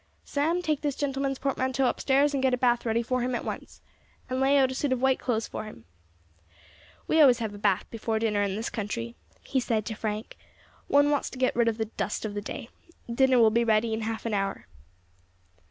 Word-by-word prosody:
"Sam, 325 +5 0
take 305 -4 0
this 290 -3 -1
gentleman's 275 -1 -1
portmanteau 260 -1 0
upstairs, 280 +3 +2
and 275 - 0
get 260 -1 +3
a - - -8
bath 240 -1 +1
ready 230 +1 +1
for 255 +1 -1
him 250 +1 -1
at - - -4
once, - - -7 0.5
and 255 - 0
lay 275 +1 +4
out 265 -1 +3
a - - -3
suit 275 +1 -1
of 260 - +1
white 265 0 +2
clothes 225 -3 -1
for - - -6
him. 115 - -12 1.2
"We 315 - +4
always 255 -5 +7
have 220 -4 -4
a 205 - -9
bath 195 -2 +1
before 225 -1 -2
dinner 215 -2 +1
in 200 -1 0
this 220 +3 -3
country," 230 +2 -4 0.3
he 265 - 0
said 225 -4 -1
to 220 - -3
Frank; 215 0 -4 0.5
"one 285 +1 +4
wants 290 - 0
to - - -10
get 255 0 +1
rid 235 0 +3
of 225 -1 +1
the 220 - -1
dust 220 - -4
of 210 - -4
the 205 - -3
day. 230 +3 -7 0.4
Dinner 260 +1 +4
will 225 -2 +6
be 235 +2 +2
ready 220 0 +2
in 220 - -2
half 220 +1 -4
an 230 - -1
hour." 195 -1 -2
240 Hz, 220 wpm, -27 LUFS, 220-265 Hz, 1.2 s, always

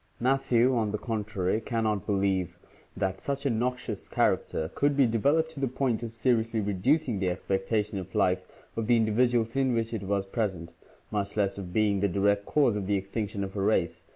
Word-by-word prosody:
Matthew, 130 -1 +3
on 110 -3 +1
the 105 - -1
contrary, 105 -2 -2
can 115 0 -2
not 105 -2 -1
believe 95 -3 0 0.2
" - - -24
that 95 0 -2
such 140 0 -2
a 140 - +2
noxious 125 +2 -2
character 80 +1 0
could 145 0 +1
be 140 - +6
developed 140 +8 +2
to 155 - -9
the 135 - +1
point 125 -2 -1
of 115 -1 -6
seriously 115 -1 +1
reducing 110 - +1
the 95 -1 +1
expectation 100 +3 -1
of 95 0 -9
life 90 0 +2 0.3
of 115 -1 -2
the 120 -1 +5
individuals 115 +1 +2
in 130 -2 +2
which 115 0 -1
it 110 - -2
was 100 0 -1
present, 95 -5 -3 0.4
much 100 0 -2
less 100 -1 +1
of 90 -2 -7
being 105 0 +2
the 100 - +2
direct 100 +2 +1
cause 140 -8 +3
of 100 -2 -3
the 100 - +2
extinction 100 +1 -3
of 95 0 -6
a 100 - -1
race." 85 -5 +1
110 Hz, 200 wpm, -28 LUFS, 100-120 Hz, 0.4 s, be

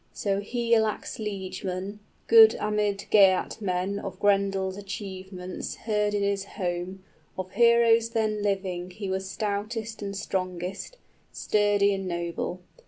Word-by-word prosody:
So 200 -1 -1
Higelac's 230 -1 0
liegeman, 195 -1 -4 0.3
Good 450 -1 +8
amid 210 -1 -1
Geatmen, 195 -1 +2
of 195 - -6
Grendel's 195 -2 +1
achievements 190 -2 -6
Heard 210 -2 0
in 200 - 0
his 200 -1 0
home: 185 -1 -4 0.3
of 185 0 -5
heroes 235 -1 +5
then 215 -2 0
living 190 -3 -2
He 195 +1 -5
was 190 0 -3
stoutest 215 +2 -3
and 200 -1 -4
strongest, 185 - -4 0.3
sturdy 205 -1 +2
and 195 -1 -3
noble. 170 +1 -3
200 Hz, 115 wpm, -27 LUFS, 190-210 Hz, 0.3 s, Good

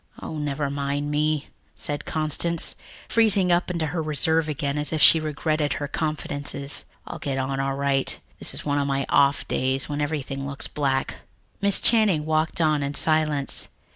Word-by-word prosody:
"Oh, 155 - -6
never 145 -1 -2
mind 140 +1 -2
me," 150 0 0 0.3
said 145 0 -4
Constance, 160 +2 0 0.3
freezing 205 -5 +4
up 175 +2 +2
into 170 -3 -1
her 160 +2 -2
reserve 155 +1 +2
again 145 0 -2
as 150 -1 -1
if 160 - -1
she 160 - +7
regretted 155 0 -1
her 145 - -4
confidences. 145 -2 -3 0.2
"I'll - - -7
get 135 -2 -3
along 135 0 -2
all 135 0 -1
right. 140 -1 0 0.2
This - - +1
is - - -5
one 145 -1 +1
of 140 - 0
my 135 -1 -1
off 140 0 +3
days, 130 -1 0
when 145 0 -3
everything 140 -2 -3
looks 140 -1 -5
black." 135 -2 -1 0.4
Miss 200 -1 +6
Channing 210 -10 +3
walked 155 +1 0
on 155 -2 +2
in 140 +1 -3
silence. 155 -2 +1
150 Hz, 170 wpm, -24 LUFS, 140-155 Hz, 0.4 s, she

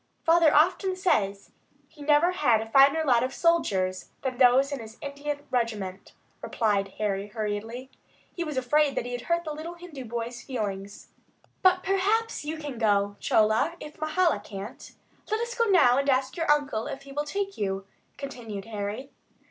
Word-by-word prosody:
Father 330 -2 +5
often 370 +5 +3
says 200 - 0 0.4
he 305 0 -17
never 300 +4 +4
had 255 -11 +3
a 220 - -4
finer 275 +7 +5
lot 245 -4 +4
of 255 - -3
soldiers 190 - +1
than 260 -2 -3
those 260 +2 +5
in 280 - -3
his 220 0 -10
Indian 285 0 -5
regiment," 215 -6 -2 0.3
replied 200 -4 0
Harry, 200 -1 -1
hurriedly. 220 +4 -4 0.4
He 345 - -2
was 305 -4 -5
afraid 280 +3 +2
that - - -1
he 245 - -5
had 245 0 -4
hurt 340 +4 0
the 310 -2 -4
little 320 +3 -7
Hindu 335 -7 -9
boy's 240 +1 -5
feelings. 205 -6 -5 0.5
"But 370 0 +4
perhaps 410 +3 +1
you 310 +2 -4
can 290 -6 -6
go, 205 -2 +2
Chola, 220 +10 +2
if 300 0 -10
Mahala 310 - +2
can't. 200 0 -9 0.4
Let 435 +1 0
us 475 +1 -3
go 465 -1 +1
now 275 - +5
and 280 0 0
ask 260 0 +1
your 330 -2 -2
uncle 285 -7 +1
if 275 - -6
he 275 - -12
will 295 +2 -2
take 395 +5 -3
you," 195 -1 -2 0.3
continued 230 -8 -7
Harry. 220 +5 -5
270 Hz, 170 wpm, -27 LUFS, 220-320 Hz, 0.5 s, Father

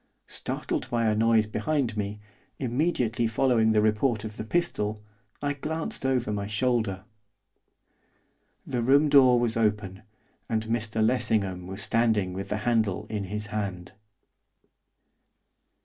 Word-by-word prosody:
Startled 125 - -4
by 120 -2 0
a 110 - +3
noise 110 0 +3
behind 130 +1 -1
me, 105 0 -3 0.4
immediately 125 -3 0
following 115 -1 +2
the 105 -1 +3
report 110 +1 +1
of 110 -1 -7
the - - -4
pistol, 110 -7 -1 0.4
I 145 0 0
glanced 155 -1 -3
over 125 -5 0
my 100 -1 -3
shoulder. 105 -3 0 1.6
The 125 - -2
room 140 +5 +4
door 130 -4 +6
was 120 -2 0
open, 105 -4 -1 0.5
and 110 -1 -1
Mr 110 -1 0
Lessingham 100 -7 +1
was 95 +2 -6
standing 110 -5 +1
with 95 +1 -5
the 105 - -1
handle 110 -4 +1
in 105 -2 -2
his 105 +2 -4
hand. 95 -4 -4
110 Hz, 130 wpm, -27 LUFS, 105-125 Hz, 1.6 s, door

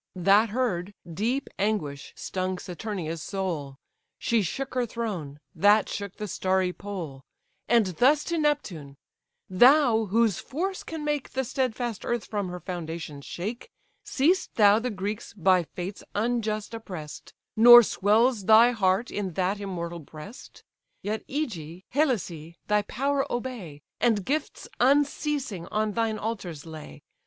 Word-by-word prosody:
That 200 +5 +4
heard, 205 -5 -1 0.2
deep 235 - -1
anguish 170 -9 -2
stung 185 0 -3
Saturnia's 180 -3 -5
soul; 165 -9 -4 0.4
She 230 -2 +1
shook 265 +9 -3
her 250 -2 0
throne, 185 -12 -4
that 205 +4 +4
shook 200 -2 -5
the 210 - -5
starry 185 -1 0
pole: 175 -10 -7 0.5
And 235 -3 +4
thus 255 - +3
to 340 -1 -2
Neptune: 180 - -1 0.5
"Thou, 240 +2 +5
whose 215 -1 +2
force 375 +7 -3
can 320 -2 -6
make 295 -2 -1
The 265 - 0
stedfast 240 -3 -2
earth 240 -2 -2
from 205 -3 -3
her 180 0 -6
foundations 160 -4 -6
shake, 220 - -5 0.3
Seest 335 +8 +1
thou 210 -1 +6
the 250 +2 -2
Greeks 205 0 -5
by 185 -1 +4
fates 185 +5 -7
unjust 220 -1 -1
oppress'd, 180 -9 -8 0.2
Nor 240 +2 +10
swells 215 +2 +2
thy 225 +3 +7
heart 200 0 +1
in 195 -4 -3
that 190 +4 0
immortal 175 -4 -5
breast? 155 - -12 0.4
Yet 215 +2 -3
Ægae, 185 - -4
Helicè, 180 - -1
thy 210 0 +2
power 275 +6 -1
obey, 230 - -5 0.2
And 215 -5 +2
gifts 305 +3 -2
unceasing 280 - +1
on 215 0 0
thine 225 0 0
altars 190 -10 -5
lay. 155 - -10
210 Hz, 135 wpm, -27 LUFS, 180-240 Hz, 0.5 s, Nor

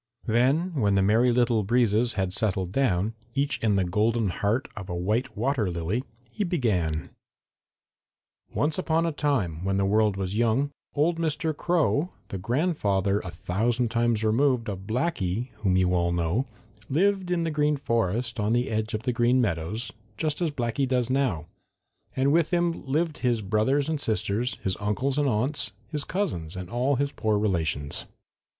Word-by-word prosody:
Then, 135 +10 +2
when 105 -9 +2
the 95 - +3
Merry 115 +5 +4
Little 120 -2 +3
Breezes 115 +1 +2
had 95 -2 -1
settled 95 -3 -1
down, 105 -4 +1 0.2
each 140 +1 0
in 110 -3 +2
the 95 - +2
golden 105 +4 +1
heart 105 +8 0
of 100 -3 -7
a 90 - -3
white 105 +9 -1
water 120 -3 +1
lily, 90 +8 -2 0.3
he 210 - -2
began: 100 - 0 1.4
"Once 150 +4 0
upon 165 -2 +1
a 165 - 0
time, 120 - -1
when 95 0 0
the 100 - +2
world 105 0 +2
was 95 -1 -2
young, 120 +5 +2 0.2
old 165 +3 +2
Mr. 160 -1 0
Crow, 170 -1 +1 0.2
the 95 - -4
grandfather 105 - +1
a 95 - -6
thousand 110 +8 -1
times 115 -2 +1
removed 120 +1 +2
of 95 0 -8
Blacky, 120 - -1
whom 95 -3 +1
you 90 -1 +2
all 85 -1 +2
know, 85 +10 0 0.4
lived 190 +5 +2
in 175 -2 +1
the 165 - -1
Green 150 -1 +1
Forest 115 -1 -1
on 105 +2 +1
the 120 0 +1
edge 110 +1 -1
of 110 - -4
the 125 - 0
Green 120 +2 +3
Meadows, 105 +2 -1 0.3
just 155 +1 -1
as 170 - +2
Blacky 130 -1 -1
does 125 -1 0
now, 130 - 0 0.7
and 135 +2 +2
with 165 -1 +3
him 170 -3 0
lived 155 +3 0
his 120 -4 +1
brothers 110 +8 +1
and 155 -2 -2
sisters, 110 +2 0
his 95 - 0
uncles 130 +7 0
and 145 -2 +2
aunts, 125 +6 -1 0.2
his 150 -3 -1
cousins 100 - -2
and 90 -1 -7
all 130 +4 +1
his 140 +2 0
poor 110 -1 0
relations. 80 -8 -1
115 Hz, 170 wpm, -26 LUFS, 100-140 Hz, 1.4 s, Merry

